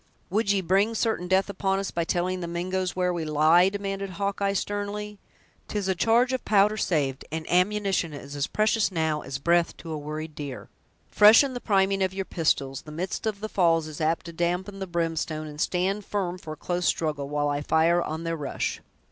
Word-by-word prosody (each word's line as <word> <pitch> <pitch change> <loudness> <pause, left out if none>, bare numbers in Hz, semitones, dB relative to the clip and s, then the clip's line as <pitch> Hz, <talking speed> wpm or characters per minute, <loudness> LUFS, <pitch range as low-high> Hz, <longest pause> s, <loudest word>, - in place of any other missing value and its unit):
"Would 205 +1 +2
ye 200 -1 +2
bring 195 +5 +2
certain 220 -5 0
death 190 +1 +3
upon 195 -1 -1
us, 195 0 -3
by 170 -1 -1
telling 180 +2 -1
the 175 - -4
Mingoes 180 +2 -2
where 180 -1 +1
we 170 -2 -2
lie?" 155 +4 +4
demanded 195 -1 -4
Hawkeye, 200 0 0
sternly; 205 +1 -3 0.5
"'Tis 205 -2 -2
a 190 - +2
charge 235 +7 +3
of 260 - -2
powder 210 0 +4
saved, 145 -9 0
and 160 0 -4
ammunition 190 -2 +1
is 140 0 -8
as 140 -1 -1
precious 215 0 +1
now 160 -3 0
as 135 -1 -5
breath 170 +4 +2
to 165 - -8
a 155 - -3
worried 155 +1 -6
deer! 140 -3 -7 0.4
Freshen 225 +6 +7
the 245 - -5
priming 195 -1 +2
of 190 0 0
your 195 -1 -2
pistols—the 150 -5 -1
midst 180 +7 -3
of 205 -2 -3
the 215 - -2
falls 165 -6 +2
is 155 0 -8
apt 160 +2 0
to 170 - -8
dampen 180 +4 -2
the 190 - -4
brimstone—and 160 -3 -3
stand 190 +3 0
firm 185 -3 -3
for 155 -3 -7
a - - -11
close 175 +1 -1
struggle, 150 -3 -1
while 145 0 0
I 145 0 -1
fire 165 +3 +3
on 160 0 -4
their 165 0 -2
rush." 145 -4 -3
180 Hz, 200 wpm, -26 LUFS, 160-200 Hz, 0.5 s, Freshen